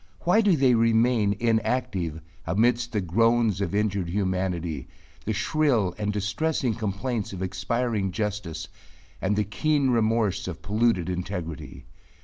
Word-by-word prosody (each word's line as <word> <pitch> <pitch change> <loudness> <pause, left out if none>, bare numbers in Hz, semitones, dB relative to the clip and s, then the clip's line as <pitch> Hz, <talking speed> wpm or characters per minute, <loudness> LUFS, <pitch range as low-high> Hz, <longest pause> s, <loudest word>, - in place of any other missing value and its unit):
Why 180 +6 +4
do 200 -6 +3
they 130 -2 +4
remain 115 -2 +3
inactive, 110 -8 0 0.3
amidst 120 +6 +2
the 105 -4 0
groans 115 +2 +2
of 100 0 -1
injured 100 -4 0
humanity, 90 -6 -2 0.4
the 110 - -1
shrill 115 - +1
and 105 -1 0
distressing 110 +6 -1
complaints 110 +1 -3
of 95 0 -4
expiring 95 +2 -1
justice 95 -6 -3 0.5
and 100 +2 +1
the 105 - +2
keen 140 +6 +1
remorse 110 -4 +1
of 90 -4 -6
polluted 105 -4 +1
integrity? 90 -4 -5
105 Hz, 125 wpm, -26 LUFS, 95-120 Hz, 0.5 s, Why